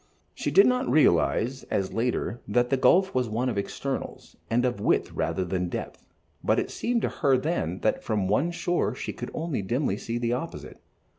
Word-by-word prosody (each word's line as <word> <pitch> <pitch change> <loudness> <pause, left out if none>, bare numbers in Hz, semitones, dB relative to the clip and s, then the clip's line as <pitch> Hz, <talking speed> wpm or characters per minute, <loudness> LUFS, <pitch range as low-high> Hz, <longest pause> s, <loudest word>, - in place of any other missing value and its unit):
She - - -2
did 395 - +7
not 250 +1 +2
realize, 130 -4 +3
as 95 -1 -2
later, 120 0 -1
that 120 +1 +1
the - - +5
gulf 190 +8 +4
was 125 -3 0
one 120 +4 0
of 115 - -3
externals, 100 - -5
and 120 +2 +2
of 125 -4 -1
width - - +1
rather 85 +3 -1
than 90 0 -2
depth, - - -6 0.4
but - - +2
it - - -3
seemed 235 -1 -1
to - - +1
her 135 -2 +2
then 125 - -2
that 110 - 0
from 105 -4 0
one 135 - +2
shore 175 0 -1
she - - -5
could - - -6
only 160 -5 -2
see 95 - -8
dimly 115 -2 -1
the 120 0 0
opposite. 150 +7 -6
125 Hz, 195 wpm, -26 LUFS, 105-155 Hz, 0.4 s, did